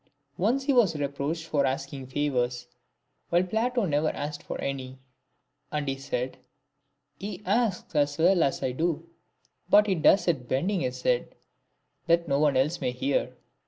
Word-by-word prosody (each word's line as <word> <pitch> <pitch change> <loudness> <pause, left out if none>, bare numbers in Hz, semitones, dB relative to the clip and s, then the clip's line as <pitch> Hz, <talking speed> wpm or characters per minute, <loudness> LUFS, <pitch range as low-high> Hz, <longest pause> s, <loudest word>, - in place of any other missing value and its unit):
Once 240 +9 +2
he 280 0 +2
was 220 -10 +4
reproached 145 +3 -3
for 150 -3 +1
asking 135 0 -3
favours, 125 -3 -1 0.6
while 175 +1 +3
Plato 230 +4 0
never 155 -1 +1
asked 145 0 -5
for - - -6
any; 130 -1 -4 0.7
and 150 -1 -2
he 135 - 0
said; 130 -2 -4 0.3
— 140 0 -50
" 145 +1 -48
He 200 -2 -6
asks 205 -2 0
as 145 -1 +2
well 175 +2 +4
as 140 - +1
I 130 - 0
do, 165 +4 -1 0.6
but 210 +1 +7
he 200 - +1
does 180 +2 +4
It 140 -8 0
Bending 180 - 0
his 125 -1 -3
head, - - 0 0.7
that 170 0 +3
no 140 -1 +1
one 145 -3 +3
else 150 +6 +1
may - - +1
hear." 135 +3 -1
150 Hz, 165 wpm, -27 LUFS, 135-180 Hz, 0.7 s, but